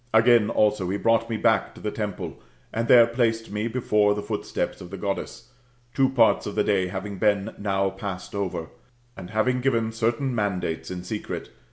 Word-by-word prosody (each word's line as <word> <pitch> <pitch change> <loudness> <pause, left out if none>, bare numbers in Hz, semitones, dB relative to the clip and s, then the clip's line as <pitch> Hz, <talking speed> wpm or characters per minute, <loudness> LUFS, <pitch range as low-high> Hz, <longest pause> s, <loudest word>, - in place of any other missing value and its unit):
Again, 115 -1 +5
also, 105 -4 +2
he 100 - 0
brought 115 +2 +2
me 115 - -1
back - - +1
to - - -12
the 105 - -3
temple, 95 -8 -5 0.3
and 115 +1 -1
there 120 -1 +8
placed 115 -2 0
me 105 +2 -2
before 105 -4 +2
the 105 - -4
footsteps - - -3
of 90 - -9
the 100 - -7
Goddess, 110 +5 -4 0.4
two 135 -1 +3
parts 120 -4 +3
of 105 - -5
the 105 - +2
day 95 -3 +1
having 95 +1 -5
been 105 +1 +1
now 95 -1 0
passed 95 -2 -6
over; 95 -5 -3 0.5
and 90 - -9
having 125 +4 +1
given 115 -4 +1
certain 115 +4 0
mandates 95 -7 -2
in 90 -1 -5
secret. 105 +3 -5
105 Hz, 185 wpm, -25 LUFS, 95-115 Hz, 0.5 s, there